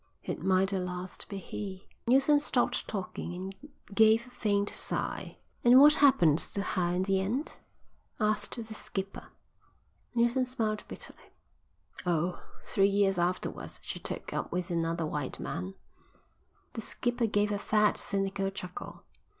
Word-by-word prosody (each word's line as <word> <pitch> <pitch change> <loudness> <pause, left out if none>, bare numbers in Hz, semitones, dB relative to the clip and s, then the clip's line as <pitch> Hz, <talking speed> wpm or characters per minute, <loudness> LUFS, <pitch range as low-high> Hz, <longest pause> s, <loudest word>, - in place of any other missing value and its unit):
It - - -4
might 190 +1 +3
at 190 - 0
last 180 0 -5
be 200 - -4
he." 190 0 -6 0.2
Neilson 270 +4 +5
stopped 255 -4 0
talking 180 -3 -4
and 190 +2 -6 0.4
gave 220 +2 +5
a 250 - -15
faint 205 -4 +1
sigh. - - -3 0.3
"And 245 +2 +8
what 295 +2 +9
happened 175 - +5
to 200 - -3
her 175 -4 0
in 185 - +1
the 190 0 +2
end?" 240 +10 -2 0.7
asked 210 -1 +1
the 225 -2 -6
skipper. 195 -2 -5 0.9
Neilson 240 +2 +3
smiled 220 -4 -1
bitterly. - - -9 0.8
"Oh, 175 0 0 0.2
three 195 0 +3
years 195 -2 +2
afterwards 180 +1 -2
she - - -5
took - - -3
up - - -3
with 180 0 -2
another 165 0 0
white 150 -3 -3
man." 90 +2 -4 1.0
The 225 - -4
skipper 240 +1 0
gave 205 0 +1
a 205 - -1
fat, 210 0 +3
cynical 195 -1 -1
chuckle. 180 -2 -8
195 Hz, 140 wpm, -30 LUFS, 180-225 Hz, 1.0 s, what